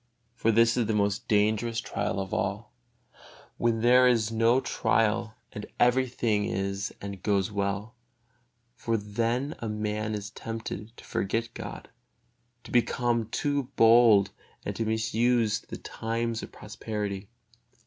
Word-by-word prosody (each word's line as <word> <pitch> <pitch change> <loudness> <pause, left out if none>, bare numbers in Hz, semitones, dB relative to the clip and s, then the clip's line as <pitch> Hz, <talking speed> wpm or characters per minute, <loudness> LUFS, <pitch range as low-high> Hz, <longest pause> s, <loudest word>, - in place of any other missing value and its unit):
For 115 -1 +1
this 115 +2 +4
is 120 -3 +1
the 110 - 0
most 100 0 0
dangerous 110 +2 +2
trial 100 -1 -2
of 95 -1 -4
all, - - -2 0.8
when 115 -1 +1
there 125 +2 +6
is 115 -3 +2
no 115 +3 +3
trial 110 -2 0 0.2
and 105 - -7
every 130 +2 +4
thing 110 -4 0
is 100 +1 -2
and 100 -2 -7
goes 100 0 +1
well; 100 +2 -2 0.8
for 115 -2 -1
then 115 +7 -1
a 115 - -4
man 105 0 -2
is 105 0 -6
tempted 115 0 -6
to - - -13
forget 115 +4 -2
God, - - -7 0.8
to - - -12
become 120 -1 +1
too 145 +2 -1
bold 115 -3 +6 0.3
and - - -3
to 115 - -2
misuse 110 0 +1
the - - -9
times 115 0 -3
of - - -8
prosperity. 105 -2 -5
110 Hz, 140 wpm, -28 LUFS, 105-115 Hz, 0.8 s, there